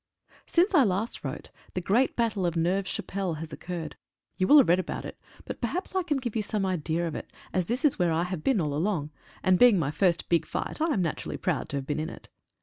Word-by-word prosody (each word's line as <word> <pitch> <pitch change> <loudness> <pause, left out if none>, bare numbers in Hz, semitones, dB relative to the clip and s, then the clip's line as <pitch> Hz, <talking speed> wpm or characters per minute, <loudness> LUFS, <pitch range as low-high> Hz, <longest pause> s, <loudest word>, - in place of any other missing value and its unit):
Since 360 +4 +3
last 220 - +2
I - - -2
wrote - - -8 0.2
the - - +1
great 215 +9 +2
battle 220 -6 +1
of 170 0 -2
Neuve 185 +4 +1
Cha - - -2
pelle 190 -3 -3
has 155 +1 -7
occurred. 175 -3 -6 0.4
You 185 0 +1
will 300 - +8
have 275 - +7
read 175 +2 +4
about 185 - -4
it, - - -7 0.3
but - - -7
perhaps 365 +3 -2
I 375 - +3
can 320 -5 -1
give 240 -4 -4
you 220 - +1
some 210 -1 -1
idea 170 -2 -1
of 160 - -4
it - - -7 0.2
,as 180 -2 0
this 250 +6 0
is 285 - +3
where 175 -2 +3
I 165 +1 +1
have 180 -3 -4
been 265 -7 +2
all 150 -4 -1
along, 155 -1 -1 0.3
and 185 -1 +4
being 245 -5 +7
my 150 -4 0
first 170 +2 +1
big 170 -1 +2
fight - - -4
I 325 - +3
am 210 - +1
naturally 165 - -3
proud - - -1
to - - -4
have 135 -1 -3
been 145 +2 -2
in 155 - -2
it. - - -12
185 Hz, 250 wpm, -28 LUFS, 165-230 Hz, 0.4 s, will